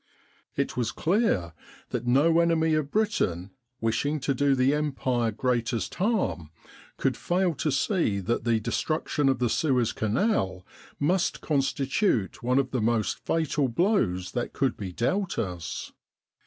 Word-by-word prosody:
It - - -1
was 120 -3 -1
clear 155 - +1 0.4
that 120 0 -3
no 155 +7 +4
enemy 165 -1 +2
of 155 -2 0
Britain, 105 - 0 0.3
wishing 125 +7 0
to 140 +1 0
do 140 +1 +2
the 130 +2 +3
Empire 130 -5 0
greatest 120 +1 -1
harm, 145 - -1 0.5
could - - 0
fail 180 0 0
to 155 - 0
see 140 - +1
that 115 +5 -1
the 115 -1 +2
destruction 150 +4 0
of 135 - +2
the 125 - +1
Suez 125 -2 +1
Canal 110 - 0 0.3
must 175 +5 +1
constitute 135 - 0
one 125 +2 +1
of 135 -1 +1
the 125 - -1
most 110 -1 0
fatal 155 -3 0
blows 115 - +1
that 120 - -3
could 135 -3 0
be 95 -3 -6
dealt 185 - -1
us. 90 -6 -4
130 Hz, 140 wpm, -27 LUFS, 115-160 Hz, 0.5 s, no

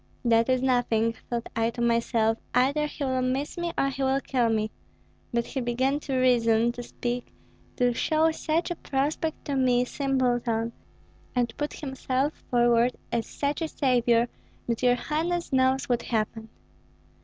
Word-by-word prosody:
'That 230 +1 +4
is 255 0 +2
nothing,' 235 -3 +2 0.2
thought 235 -1 -2
I 225 0 +2
to 235 - -8
myself; 230 -1 +2 0.2
'either 280 +4 +3
he 295 - -6
will 260 -1 0
miss 260 +3 -1
me 345 -1 -2
or 275 - +2
he 275 0 -5
will 265 0 +2
kill 250 -4 +1
me.' 215 -1 0 0.6
But 235 0 0
he 270 - -3
began 260 +4 0
to 275 -2 -3
reason, 235 -2 +3
to 245 - -7
speak, 245 0 -4 0.4
to 245 -1 +2
show 315 +6 +2
such 320 +2 -1
a - - -1
prospect 295 +4 -2
to 285 - -2
me, 250 -2 +3
simpleton, 245 -4 0 0.6
and 240 -2 0
put 295 0 -3
himself 270 0 -2 0.2
forward 240 0 +3 0.2
as 230 -1 -1
such 285 +3 -2
a 325 - 0
savior, 240 -5 +2 0.4
that 235 -1 -1
your 245 -1 +4
highness 325 +5 -2
knows 260 +1 +3
what 240 -1 +1
happened." 220 -1 -2
250 Hz, 160 wpm, -27 LUFS, 235-275 Hz, 0.6 s, That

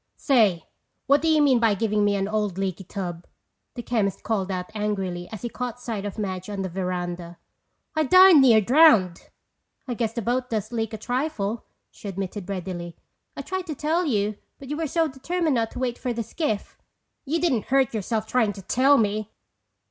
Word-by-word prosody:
"Say, 215 - +2 0.4
what 280 +1 +4
do 325 - 0
you 310 -2 +4
mean 265 -4 +4
by 225 -3 +3
giving 210 0 0
me 205 0 +2
an 195 0 -1
old 210 -3 -1
leaky 195 -1 -3
tub?" 175 -2 -6 0.5
the 240 - -6
chemist 215 -6 -1
called 200 -4 -1
out 180 +1 -4
angrily 195 -5 -3
as 220 -1 -8
he - - -1
caught 245 0 -5
sight 225 -5 -4
of 205 - -5
Madge 185 -2 -4
on 200 -2 -3
the 190 - -3
veranda. 175 -1 -4 0.6
"I 310 0 +2
darn 370 0 +8
near 230 -5 +6
drowned!" 220 - +4 0.6
"I 250 - -2
guess 230 -2 -2
the 235 -1 -3
boat 250 +2 -1
does 220 -1 -3
leak 225 -2 -2
a - - -3
trifle," 235 -3 -2 0.3
she - - -11
admitted 195 0 -5
readily. 180 -3 -5 0.4
"I - - -4
tried 375 -1 -4
to 310 - -4
tell 320 +5 0
you 210 -4 0 0.2
but 270 - -11
you 295 - -3
were 325 -1 -1
so 325 +3 +1
determined 315 +4 -1
not 230 -2 0
to - - -6
wait 245 -2 -2
for 250 -2 -2
the 230 0 -3
skiff." 225 -2 -3 0.4
"You 315 +4 -1
didn't 280 -11 +1
hurt 265 -3 +2
yourself 220 +1 -2
trying 220 -3 +1
to 195 - -11
tell 270 +8 +4
me! 215 -1 0
220 Hz, 195 wpm, -24 LUFS, 195-260 Hz, 0.6 s, darn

